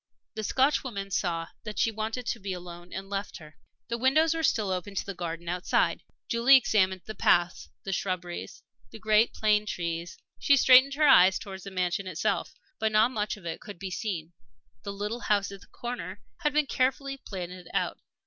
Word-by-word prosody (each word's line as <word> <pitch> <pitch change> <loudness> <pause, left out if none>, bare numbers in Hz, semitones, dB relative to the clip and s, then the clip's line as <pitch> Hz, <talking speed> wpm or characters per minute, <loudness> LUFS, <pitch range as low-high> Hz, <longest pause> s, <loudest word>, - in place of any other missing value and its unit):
The 220 - -4
Scotchwoman 255 -6 0
saw 165 -3 -1
that 215 -2 -7
she 225 - +2
wanted 220 +3 -4
to 235 - -2
be 195 -2 -4
alone 175 0 -9
and 190 +1 -6
left 200 0 -4
her. 155 -2 -14 0.3
The 235 0 -3
windows 310 +6 +4
were 330 - -2
still 215 -10 +1
open 185 +2 -4
to - - -2
the 200 - -5
garden 170 -1 -5
outside. 180 +1 +1 0.3
Julie 240 +4 +6
examined 190 -7 +1
the 215 - -6
paths, 175 -4 +2
the 195 - -3
shrubberies, 180 -2 -4 0.3
the - - -10
great 215 +1 +3
plane 210 -1 +2
trees; 170 -2 -4 0.2
she 280 - +5
strained 260 +1 +7
her 300 0 +4
eyes 190 -7 +7
towards 190 -1 -9
the - - -5
mansion 185 0 -1
itself. 190 +4 -1 0.2
But 220 0 +1
not 215 +3 +4
much 210 -3 -2
of 190 - -15
it 165 - -5
could 205 - -9
be 190 +1 -6
seen. 175 -5 -4 0.5
The 200 - -5
little 210 +4 -4
house 205 -3 0
at 195 -1 -10
the - - -17
corner 245 +1 -6 0.2
had 305 -4 0
been 300 0 +2
carefully 270 +1 0
planted 180 -6 -8
out. - - -1
200 Hz, 190 wpm, -28 LUFS, 180-235 Hz, 0.5 s, strained